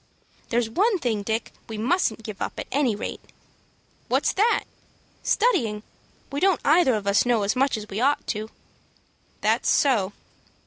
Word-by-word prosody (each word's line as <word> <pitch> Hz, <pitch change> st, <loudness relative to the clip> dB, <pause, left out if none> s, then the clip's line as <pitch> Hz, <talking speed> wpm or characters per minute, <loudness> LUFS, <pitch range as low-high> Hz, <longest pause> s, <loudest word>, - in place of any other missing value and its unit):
"There's 235 Hz, -1 st, +1 dB
one 395 Hz, -, +2 dB
thing, 235 Hz, -, -1 dB
Dick, 220 Hz, +3 st, -3 dB, 0.2 s
we 220 Hz, -, -5 dB
mustn't 225 Hz, -, 0 dB
give 210 Hz, -3 st, -8 dB
up -, -, -2 dB
at -, -, -4 dB
any 265 Hz, -6 st, +1 dB
rate." -, -, -5 dB, 0.9 s
"What's -, -, +1 dB
that?" 440 Hz, +4 st, +2 dB, 0.6 s
"Studying. 225 Hz, -, +1 dB, 0.5 s
We 280 Hz, -, -2 dB
don't 380 Hz, -1 st, +3 dB
either 305 Hz, -5 st, +5 dB
of 210 Hz, -2 st, -3 dB
us 200 Hz, +1 st, +3 dB
know 240 Hz, -4 st, +2 dB
as 200 Hz, +4 st, 0 dB
much 270 Hz, -1 st, +2 dB
as 210 Hz, -1 st, -7 dB
we 210 Hz, +2 st, -4 dB
ought 280 Hz, +3 st, +2 dB
to." 215 Hz, 0 st, -3 dB, 0.9 s
"That's -, -, +2 dB
so." 225 Hz, -10 st, +2 dB
235 Hz, 155 wpm, -24 LUFS, 215-290 Hz, 0.9 s, either